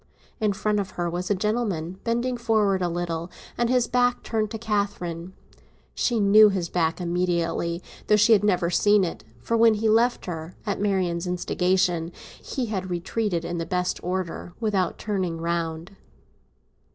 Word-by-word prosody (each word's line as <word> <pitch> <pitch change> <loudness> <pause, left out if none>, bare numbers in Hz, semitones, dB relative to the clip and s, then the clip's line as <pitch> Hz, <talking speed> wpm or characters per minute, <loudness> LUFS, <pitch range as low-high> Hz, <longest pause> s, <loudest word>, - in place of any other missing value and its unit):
In 215 -2 +2
front 210 +1 0
of 195 -2 -3
her 175 -1 0
was 175 +2 -3
a 205 - +3
gentleman, 195 -4 -2
bending 240 +2 0
forward 215 -5 +1
a 175 - +1
little, 170 0 -3 0.3
with 240 -1 0
his 250 -1 +3
back 245 0 +1
turned 215 -2 -1
to 225 - -5
Catherine. 200 -5 -2 0.6
She 235 -3 0
knew 210 +1 +7
his 185 -4 -2
back 165 -1 0
immediately, 170 -1 -1 0.2
though 210 - +5
she 210 +2 +5
had 205 -2 +4
never 180 -4 +2
seen 205 +3 +4
it; 170 - -4 0.2
for 230 - 0
when 225 -1 +5
he 215 +2 -3
had 215 - +5
left 240 +2 +2
her, 165 -1 -6
at 200 -2 -2
Marian's 185 -4 0
instigation, 180 -1 0 0.3
he 260 - -3
had 190 -4 -3
retreated 175 0 -2
in 170 0 -3
the - - -1
best 180 +1 -1
order, 180 -1 -3
without 205 -5 0
turning 185 -6 -2
round. 170 +2 -3
190 Hz, 165 wpm, -25 LUFS, 175-215 Hz, 0.6 s, knew